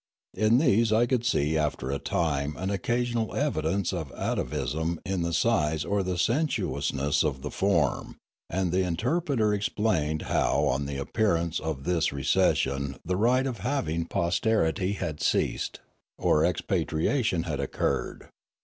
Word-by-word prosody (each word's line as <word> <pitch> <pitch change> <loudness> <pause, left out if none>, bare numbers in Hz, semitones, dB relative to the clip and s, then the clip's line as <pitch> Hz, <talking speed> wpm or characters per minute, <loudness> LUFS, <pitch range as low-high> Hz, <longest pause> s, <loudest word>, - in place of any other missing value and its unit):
In 110 +2 +3
these 115 -6 +3
I 110 +2 +4
could 120 -1 0
see 80 -10 +1
after 75 -4 -1
a 70 - -2
time 75 -3 -1
an 95 +2 -2
occasional 120 +3 -1
evidence 100 - 0
of 80 -6 -4
atavism 80 +6 -2
in 95 -1 -1
the 85 0 -1
size 80 -6 +1
or 100 0 +1
the 90 -1 -2
sensuousness 90 - 0
of 65 -4 -2
the 75 - -4
form, 85 -9 0 0.3
and 90 -1 -1
the 95 +2 +2
interpreter 115 - 0
explained 95 -7 0
how - - +1
on 70 +2 0
the 70 -1 -4
appearance 85 +1 0
of 75 -4 -4
this 85 -1 +1
recession 70 0 +1
the 90 - 0
right 125 +6 +3
of 125 -5 -3
having 85 - -1
posterity 90 +1 +1
had 80 -6 -4
ceased, - - 0 0.4
or - - +3
expatriation 85 - 0
had 75 -5 -3
occurred. 70 - -2
90 Hz, 140 wpm, -27 LUFS, 75-110 Hz, 0.4 s, I